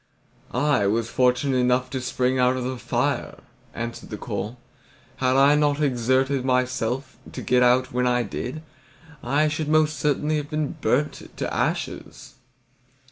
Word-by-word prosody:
"I 125 -6 +2
was 115 +3 0
fortunate 130 +1 +2
enough 125 0 +1
to 130 - -3
spring 125 +1 0
out 125 +1 +3
of 130 - -3
the 130 0 -4
fire," - - -1 0.4
answered 115 0 -6
the - - -5
coal. 110 +5 -5 0.6
"Had 130 0 +1
I 140 +2 +6
not 150 -1 +2
exerted 130 0 +1
myself 130 0 -1
to - - -6
get 125 0 +3
out 125 +1 +3
when 125 0 +1
I 125 0 +2
did, 125 +8 -5 0.6
I 145 +5 +2
should 155 0 -2
most 155 -2 +2
certainly 150 +1 +1
have 145 -1 -4
been 155 -2 -1
burnt 130 +7 -1
to - - -3
ashes." - - -3
130 Hz, 150 wpm, -24 LUFS, 125-145 Hz, 0.6 s, I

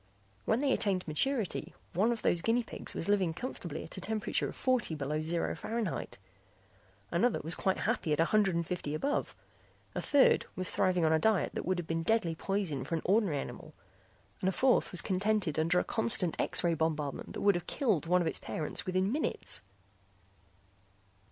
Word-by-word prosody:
When 225 +4 +2
they 280 -2 +2
attained 190 -5 0
maturity 220 - 0 0.2
one 210 +7 +2
of 235 - -3
those 170 - +3
guinea 230 +5 +2
pigs - - -6
was - - -3
living 190 -5 +2
comfortably 215 -6 -5
at - - -9
a - - -5
temperature 215 +2 -1
of - - -9
forty 255 -10 +1
below 150 +1 -2
zero 165 +2 -1
Fahrenheit, 230 -1 -3 0.9
another 245 -1 +2
was 165 - +2
quite 190 +2 0
happy 215 -7 -1
at 150 - +1
a 165 - +5
hundred 195 -2 +2
and 170 0 0
fifty 155 -4 -3
above. 280 - -1 0.6
A - - -2
third 285 -2 +4
was 185 0 -1
thriving 180 -3 +2
on 160 - +3
a 160 - +3
diet 220 +1 +2
that - - -4
would 185 0 +1
have 175 - -3
been 165 0 -1
deadly 175 -1 +1
poison 185 -4 -2
for 165 - -2
an 160 - -3
ordinary 195 -5 +2
animal - - -7 0.6
and 190 - +1
a - - +1
fourth 255 +7 +2
was 180 - +1
contented 195 -4 0
under 165 +3 +2
a - - +3
constant 215 -7 +3
X - - +1
ray 170 -1 +3
bombardment 155 -3 -2
that - - -5
would 200 0 +5
have 175 -1 -4
killed 215 - 0
one 180 +1 +3
of 170 - 0
its - - 0
parents 155 +3 -3
within 185 +2 +1
minutes. 300 +4 -2
185 Hz, 190 wpm, -31 LUFS, 165-220 Hz, 0.9 s, a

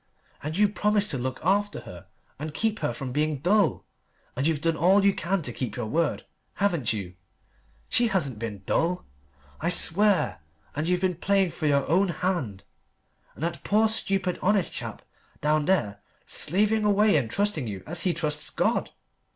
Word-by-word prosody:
And 155 +3 -4
you 210 +1 +5
promised 210 0 +1
to 135 - -1
look 130 +1 -3
after 200 -1 +1
her 90 -8 -11 0.3
and 150 0 -6
keep 220 +3 0
her - - -1
from 125 +2 -6
being 150 +2 0
dull. 185 +5 +2 0.5
And 135 +4 0
you've 160 -3 +1
done 165 0 +1
all 190 +5 +4
you 200 - +5
can 185 +1 -1
to 125 - -3
keep 125 -1 -4
your 120 - -3
word, 160 +7 -1 0.3
haven't 175 - +1
you? 100 -5 -4 0.7
She 240 - +4
hasn't 150 - 0
been 105 -4 -5
dull, 175 +2 0 0.5
I 165 - 0
swear. 180 - +2 0.4
And 155 +2 -2
you've 180 0 +1
been 185 -3 0
playing 195 -1 +2
for 160 -1 -2
your 140 -1 +2
own 185 +5 +3
hand 165 - -2 0.7
and - - -7
that 170 0 -3
poor 215 +2 +3
stupid 195 -4 -1
honest 200 -1 +2
chap 115 -3 -6 0.4
down 150 0 +1
there 105 - +1 0.2
slaving 210 +6 +2
away 210 -1 +4
and 130 -7 +1
trusting 200 - 0
you 95 -3 -6
as 170 +2 -3
he 185 - +2
trusts 150 -3 -2
God. - - 0
170 Hz, 175 wpm, -26 LUFS, 140-195 Hz, 0.7 s, you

